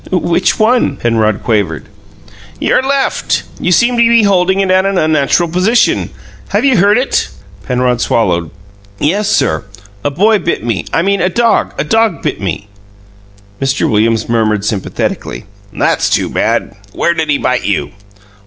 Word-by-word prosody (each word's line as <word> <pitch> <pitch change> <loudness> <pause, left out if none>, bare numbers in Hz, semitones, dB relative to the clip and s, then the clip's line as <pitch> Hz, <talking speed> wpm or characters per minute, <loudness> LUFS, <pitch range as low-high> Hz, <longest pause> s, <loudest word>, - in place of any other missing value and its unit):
"Which 180 0 +1
one?" 220 - +2
Penrod 110 -3 0
quavered. 105 -4 -1 0.7
"Your - - +2
left. 275 +1 -1 0.2
You 180 - -1
seem 240 +6 +3
to - - +3
be 235 -1 +4
holding 190 -1 +2
it 195 -1 +1
at 185 0 +3
an 195 -1 0
unnatural 155 +1 +2
position. 185 +8 +1 0.4
Have - - 0
you 265 -5 +3
hurt 200 +3 +4
it?" 255 - 0 0.4
Penrod 125 -1 0
swallowed. 85 -7 0 0.5
"Yes, 200 - 0
sir. 80 -1 +1 0.4
A - - +1
boy 205 +9 +2
bit 170 - -2
me 115 -7 -2
I 165 - +1
mean 200 0 +1
a 180 - +2
dog 235 +4 +1
a - - 0
dog 225 +7 0
bit - - -3
me." 95 +1 -4 0.9
Mr. 135 0 0
Williams 110 +1 +1
murmured 110 -3 0
sympathetically: 105 -3 -3 0.3
"That's - - 0
too - - 0
bad! - - -1 0.2
Where 170 - +1
did 160 -2 -2
he 145 - +2
bite 125 -2 -1
you?" 75 -8 -1
165 Hz, 155 wpm, -13 LUFS, -, 0.9 s, be